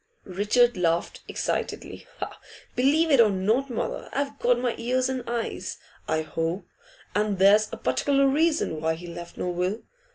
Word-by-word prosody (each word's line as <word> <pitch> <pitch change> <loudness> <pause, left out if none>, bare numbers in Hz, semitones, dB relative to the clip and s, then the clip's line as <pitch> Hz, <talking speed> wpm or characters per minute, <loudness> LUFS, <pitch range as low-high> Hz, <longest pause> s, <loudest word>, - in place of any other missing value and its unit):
Richard 210 +5 +2
laughed 170 -1 0
excitedly. - - -3 0.7
'Believe 305 +6 +3
it 270 -4 +7
or 220 - +6
not, 215 +8 +1
mother; 235 - -3
I've 280 0 -2
got 245 0 +3
my 245 -1 0
ears 255 +2 +1
and 260 -2 -2
eyes, 235 -1 -3 0.3
I 160 0 0
hope. 165 +4 -3 0.5
And 210 -1 +1
there's 205 +3 +5
a - - -5
particular 275 - +2
reason 300 - +1
why 160 0 +1
he 175 +2 -10
left 170 0 -8
no 180 - -2
will. 180 +5 -2
215 Hz, 155 wpm, -26 LUFS, 180-255 Hz, 0.7 s, it